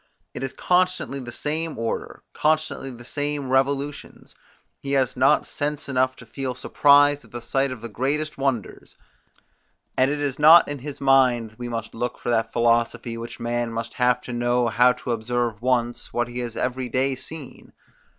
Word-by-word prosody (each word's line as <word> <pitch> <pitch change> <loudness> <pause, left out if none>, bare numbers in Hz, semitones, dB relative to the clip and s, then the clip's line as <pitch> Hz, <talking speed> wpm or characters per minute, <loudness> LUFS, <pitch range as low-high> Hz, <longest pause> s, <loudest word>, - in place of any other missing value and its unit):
It - - -6
is 135 -1 -3
constantly 180 -5 0
the 120 -2 -7
same 155 +3 -3
order, 115 0 -4
constantly 155 -3 0
the 120 -2 -11
same 145 -1 -3
revolutions; 140 +2 -1 0.5
he 140 0 -3
has 130 -3 +1
not 130 +2 +3
sense 145 0 -3
enough 130 -1 +1
to 115 - -13
feel 130 +1 -4
surprise 145 +2 +4
at - - -18
the 120 - -6
sight 135 +3 0
of 130 -3 -7
the 115 - -5
greatest 145 +7 -2
wonders; 135 -8 -3 1.0
and 130 +1 +3
it 145 0 -2
is 145 -2 -2
not 160 +3 +8
in 145 -1 -4
his 140 +2 -7
mind 130 -5 +3
we 120 0 -5
must 115 -2 -5
look 120 +2 -3
for 120 - -3
that 115 -1 +1
philosophy, 120 0 +1
which 115 0 -7
man 120 0 -2
must 115 0 -4
have 125 0 +2
to 125 - -7
know 120 0 +1
how 125 +3 +5
to 125 - -5
observe 115 -1 -1
once, 120 -1 -1
what 120 -1 0
he 120 0 -6
has 120 -2 -5
every 125 0 -2
day 135 +2 +1
seen. 135 +2 -10
130 Hz, 180 wpm, -24 LUFS, 120-140 Hz, 1.0 s, not